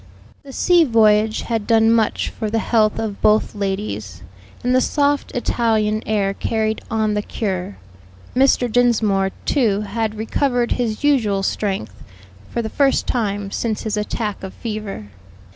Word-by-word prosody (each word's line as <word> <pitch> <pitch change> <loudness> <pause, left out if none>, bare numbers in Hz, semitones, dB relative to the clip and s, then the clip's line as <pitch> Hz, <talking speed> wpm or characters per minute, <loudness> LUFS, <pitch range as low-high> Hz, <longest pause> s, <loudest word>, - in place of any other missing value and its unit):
The 275 - -12
sea 350 +5 +4
voyage 220 -4 +3
had 225 -3 -2
done 225 -1 +4
much 225 -2 +1
for 220 - -4
the 225 - 0
health 220 -1 +2
of 215 -3 -4
both 215 +1 +3
ladies, 190 - -4 0.4
and 250 +1 +1
the 255 - +4
soft 285 0 +1
Italian 220 -3 0
air 200 -2 +1
carried 220 +1 -1
on 220 -1 0
the 210 - 0
cure. 185 - -4 0.6
Mr. 255 -1 +3
Dinsmore, 215 -5 +2 0.2
too, 215 -7 +2
had 220 0 -2
recovered 245 +2 0
his 230 0 -1
usual 220 -9 +2
strength, 190 - -3 0.5
for 235 - -2
the - - -3
first 270 +4 +1
time 205 -4 -2
since 220 -1 -2
his 220 -1 -2
attack 210 0 -3
of 190 -1 -8
fever. 210 - -6
220 Hz, 145 wpm, -20 LUFS, 205-235 Hz, 0.6 s, sea